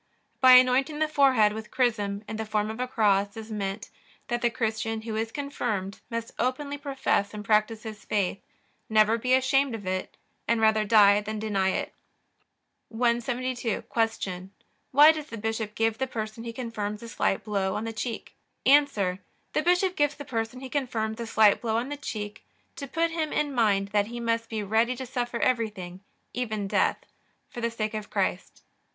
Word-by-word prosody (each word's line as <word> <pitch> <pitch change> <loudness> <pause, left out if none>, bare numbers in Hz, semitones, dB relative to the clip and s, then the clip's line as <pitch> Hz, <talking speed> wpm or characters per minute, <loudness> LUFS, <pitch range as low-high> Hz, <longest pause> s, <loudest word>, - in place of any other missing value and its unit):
By 255 -1 +8
anointing 255 +4 +5
the 310 0 +1
forehead 265 -8 +4
with 220 0 -7
chrism 210 -5 0
in 220 - -5
the 220 - -2
form 210 0 0
of 220 - -8
a 250 - -1
cross 205 -4 +1
is 220 0 -8
meant, 200 0 -4 0.4
that 240 -1 -1
the 240 - +3
Christian 225 -1 -2
who 220 -1 -4
is 225 +1 -2
confirmed 225 -9 -3
must 230 0 -4
openly 280 +3 -1
profess 270 -7 -1
and 210 0 -7
practice 215 +1 +2
his 215 -2 -8
faith, 200 -2 -1 0.5
never 215 +1 +4
be 255 +2 +3
ashamed 265 -1 +2
of 205 -3 -8
it, 185 0 -3 0.3
and 230 0 +2
rather 220 -1 +3
die 205 -1 +6
than 215 +1 -5
deny 205 -3 0
it. - - -2 1.0
172. 240 0 -1
Q. 195 -5 -2 0.4
Why 295 +4 +8
does 310 -2 -6
the 230 - -7
bishop 220 0 -3
give 225 0 0
the 265 - 0
person 220 -1 -5
he 230 - -4
confirms 225 -3 -5
a - - -7
slight 195 - 0
blow 200 -2 -1
on 210 - -2
the 225 0 -4
cheek? 225 +1 -5 0.3
A. 280 +2 +8
The 195 +4 -4
bishop 360 +2 +2
gives 290 0 +1
the 290 - -9
person 230 -1 -3
he 265 - -7
confirms 230 -5 -2
a 230 - -4
slight 215 -2 +4
blow 225 -1 0
on 245 +4 -2
the 290 - -3
cheek, 210 -5 -6 0.3
to 280 - -5
put 330 +5 0
him 320 -2 -2
in 290 -2 0
mind 205 -5 +2
that 205 0 +1
he 240 +1 -6
must 230 -1 -1
be 220 -2 -3
ready 225 +5 +1
to 260 +1 -6
suffer 245 -1 -3
everything, 210 -7 -1 0.3
even 215 -5 -2
death, - - +2 0.5
for 240 - -7
the 235 - +1
sake 220 -1 -3
of 215 -1 -5
Christ. - - -2
225 Hz, 185 wpm, -27 LUFS, 210-255 Hz, 1.0 s, By